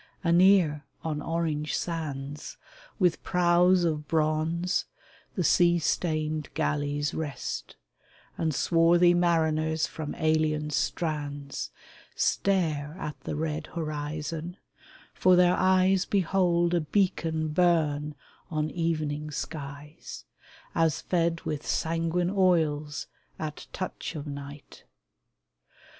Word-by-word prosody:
Anear 170 Hz, -3 st, +4 dB, 0.2 s
on 150 Hz, -2 st, -2 dB
orange 155 Hz, -2 st, -1 dB
sands, 145 Hz, -4 st, -4 dB, 0.4 s
With 180 Hz, -5 st, +2 dB
prows 180 Hz, 0 st, +3 dB
of 150 Hz, -3 st, -1 dB
bronze 160 Hz, +3 st, 0 dB, 0.5 s
the 180 Hz, -, 0 dB
sea 175 Hz, +2 st, +4 dB
stained 155 Hz, -2 st, -1 dB
galleys 145 Hz, -2 st, -1 dB
rest, 150 Hz, -3 st, -4 dB, 0.6 s
And 160 Hz, -1 st, 0 dB
swarthy 170 Hz, +4 st, +4 dB
mariners 160 Hz, -2 st, +2 dB
from 155 Hz, -2 st, -6 dB
alien 155 Hz, -1 st, +1 dB
strands 145 Hz, -3 st, -2 dB, 0.5 s
Stare 160 Hz, -6 st, 0 dB
at 150 Hz, -, -5 dB
the -, -, -5 dB
red 155 Hz, 0 st, -3 dB
horizon, 155 Hz, +2 st, -4 dB, 0.6 s
for 185 Hz, -1 st, +4 dB
their 180 Hz, 0 st, +5 dB
eyes 185 Hz, 0 st, +3 dB
Behold 175 Hz, -2 st, +2 dB
a 175 Hz, -, +2 dB
beacon 160 Hz, -2 st, 0 dB
burn 150 Hz, -3 st, +1 dB, 0.3 s
on 155 Hz, -1 st, -1 dB
evening 155 Hz, -3 st, -2 dB
skies, 145 Hz, -, -7 dB, 0.5 s
As 165 Hz, -2 st, +2 dB
fed 170 Hz, -2 st, 0 dB
with 150 Hz, -1 st, -4 dB
sanguine 165 Hz, +2 st, 0 dB
oils 155 Hz, -6 st, +1 dB, 0.3 s
at 155 Hz, -1 st, -6 dB
touch 185 Hz, -2 st, -5 dB
of 150 Hz, -1 st, -5 dB
night. 140 Hz, 0 st, -9 dB
160 Hz, 100 wpm, -28 LUFS, 150-175 Hz, 0.6 s, their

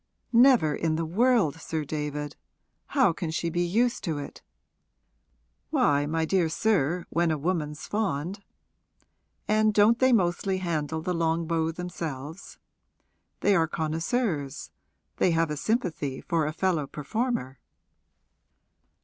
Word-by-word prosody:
'Never 235 Hz, -, +6 dB
in 160 Hz, +1 st, 0 dB
the 165 Hz, +1 st, -1 dB
world, 200 Hz, -, +2 dB
Sir 155 Hz, -2 st, -3 dB
David. 150 Hz, 0 st, -4 dB, 0.5 s
How 260 Hz, -, +3 dB
can 170 Hz, -1 st, -4 dB
she 165 Hz, +1 st, -2 dB
be 175 Hz, -, 0 dB
used 230 Hz, +8 st, +1 dB
to 160 Hz, -4 st, -1 dB
it?' 145 Hz, -, -8 dB, 1.3 s
'Why, 145 Hz, 0 st, +2 dB
my 160 Hz, +1 st, 0 dB
dear 175 Hz, -1 st, +1 dB
sir, 175 Hz, -3 st, +1 dB
when 170 Hz, 0 st, +2 dB
a 155 Hz, -, 0 dB
woman's 150 Hz, -1 st, -2 dB
fond! 200 Hz, -2 st, -2 dB, 1.0 s
And 215 Hz, 0 st, +3 dB
don't 215 Hz, +3 st, +5 dB
they 260 Hz, 0 st, +4 dB
mostly 190 Hz, -2 st, +1 dB
handle 160 Hz, -3 st, -2 dB
the 180 Hz, 0 st, -1 dB
long 165 Hz, 0 st, 0 dB
bow 165 Hz, 0 st, 0 dB
themselves? 165 Hz, -2 st, -6 dB, 0.8 s
They 205 Hz, -, +4 dB
are 165 Hz, -3 st, +3 dB
connoisseurs 160 Hz, -, -2 dB, 0.5 s
they -, -, +3 dB
have 165 Hz, -1 st, +1 dB
a -, -, -1 dB
sympathy 160 Hz, -, -1 dB
for 165 Hz, -3 st, 0 dB
a -, -, -1 dB
fellow 170 Hz, -5 st, 0 dB
performer.' 150 Hz, -, -3 dB
165 Hz, 130 wpm, -27 LUFS, 155-195 Hz, 1.3 s, Never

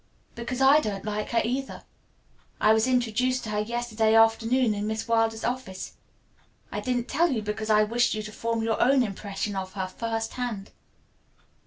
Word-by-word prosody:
"Because 240 Hz, +2 st, -4 dB
I 275 Hz, +3 st, +7 dB
don't 205 Hz, -8 st, -4 dB
like 210 Hz, 0 st, -3 dB
her, 235 Hz, -, +2 dB
either. 265 Hz, +3 st, -3 dB, 0.8 s
I 215 Hz, -, +5 dB
was 220 Hz, +2 st, +2 dB
introduced 250 Hz, 0 st, +1 dB
to 215 Hz, -, -5 dB
her 210 Hz, -, 0 dB
yesterday 225 Hz, 0 st, 0 dB
afternoon 225 Hz, +2 st, +4 dB
in 205 Hz, 0 st, -3 dB
Miss 220 Hz, 0 st, -3 dB
Wilder's 225 Hz, -1 st, +1 dB
office. 240 Hz, -7 st, -4 dB, 0.8 s
I -, -, -3 dB
didn't 245 Hz, -2 st, -1 dB
tell 340 Hz, +2 st, +2 dB
you, 225 Hz, -5 st, -1 dB
because 215 Hz, +1 st, -4 dB
I 215 Hz, 0 st, +5 dB
wished 235 Hz, +2 st, +1 dB
you 215 Hz, -, -3 dB
to 215 Hz, -, -7 dB
form 230 Hz, +1 st, -2 dB
your 225 Hz, -1 st, 0 dB
own 260 Hz, +1 st, +4 dB
impression 200 Hz, -1 st, -4 dB
of 190 Hz, -1 st, -4 dB
her, 190 Hz, -2 st, -2 dB
first 225 Hz, +3 st, -4 dB
hand." 235 Hz, -6 st, -4 dB
225 Hz, 175 wpm, -26 LUFS, 215-245 Hz, 0.8 s, I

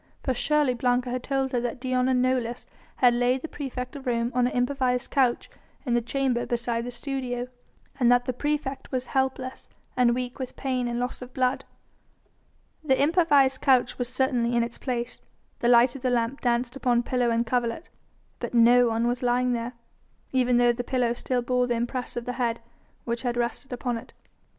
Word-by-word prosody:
For 260 Hz, -, +1 dB
surely 295 Hz, +1 st, +2 dB
Blanca 245 Hz, +1 st, 0 dB
had 250 Hz, 0 st, -2 dB
told 270 Hz, 0 st, -1 dB
her 245 Hz, -3 st, 0 dB
that 245 Hz, +1 st, -3 dB
Dion 255 Hz, 0 st, 0 dB
and 250 Hz, -1 st, +2 dB
Nolus 250 Hz, -1 st, -1 dB, 0.3 s
had 245 Hz, -2 st, +4 dB
laid 245 Hz, +2 st, +1 dB
the -, -, -3 dB
praefect 265 Hz, -3 st, -6 dB
of 275 Hz, -2 st, -8 dB
Rome 235 Hz, 0 st, 0 dB
on 250 Hz, 0 st, +3 dB
an -, -, -4 dB
improvised 250 Hz, 0 st, 0 dB
couch 255 Hz, -3 st, +2 dB, 0.4 s
in 245 Hz, -, 0 dB
the 240 Hz, -, +3 dB
chamber 250 Hz, 0 st, 0 dB
beside 235 Hz, -1 st, -1 dB
the -, -, -4 dB
studio, 245 Hz, 0 st, -4 dB, 0.5 s
and 245 Hz, -2 st, +5 dB
that 245 Hz, 0 st, +4 dB
the 255 Hz, -, -1 dB
praefect 285 Hz, 0 st, -3 dB
was 255 Hz, -1 st, -1 dB
helpless 265 Hz, 0 st, -2 dB, 0.3 s
and 240 Hz, -1 st, +3 dB
weak 250 Hz, +1 st, -4 dB
with 260 Hz, -1 st, -5 dB
pain 255 Hz, -2 st, -1 dB
and 240 Hz, 0 st, -2 dB
loss 245 Hz, +1 st, -3 dB
of 250 Hz, 0 st, -10 dB
blood. 255 Hz, 0 st, 0 dB, 1.2 s
The 265 Hz, -4 st, +2 dB
improvised 285 Hz, -4 st, +3 dB
couch 260 Hz, -2 st, +3 dB
was 245 Hz, -1 st, -1 dB
certainly 255 Hz, -2 st, 0 dB
in 235 Hz, -, +3 dB
its 235 Hz, 0 st, -6 dB
place, 245 Hz, -2 st, -3 dB, 0.4 s
the 235 Hz, -, 0 dB
light 240 Hz, +1 st, +6 dB
of 275 Hz, -, -8 dB
the 255 Hz, -, +1 dB
lamp 245 Hz, +2 st, 0 dB
danced 245 Hz, +1 st, 0 dB
upon 245 Hz, -3 st, +1 dB
pillow 245 Hz, -1 st, +1 dB
and 230 Hz, 0 st, +1 dB
coverlet, 240 Hz, +5 st, -1 dB, 0.5 s
but -, -, -4 dB
no 240 Hz, +1 st, +6 dB
one 230 Hz, 0 st, 0 dB
was 245 Hz, +1 st, 0 dB
lying 250 Hz, 0 st, +2 dB
there, 235 Hz, +1 st, -3 dB, 0.6 s
even 250 Hz, -2 st, +3 dB
though 240 Hz, 0 st, +4 dB
the 245 Hz, +1 st, -4 dB
pillow 245 Hz, -2 st, 0 dB
still 245 Hz, 0 st, -2 dB
bore 250 Hz, 0 st, +1 dB
the 240 Hz, -, 0 dB
impress 245 Hz, +2 st, -3 dB
of 240 Hz, -, -3 dB
the 250 Hz, -, -3 dB
head 235 Hz, -1 st, 0 dB, 0.5 s
which 235 Hz, 0 st, -2 dB
had 245 Hz, -2 st, -2 dB
rested 240 Hz, +3 st, -2 dB
on 240 Hz, -2 st, 0 dB
it. -, -, -15 dB
250 Hz, 195 wpm, -26 LUFS, 240-260 Hz, 1.2 s, light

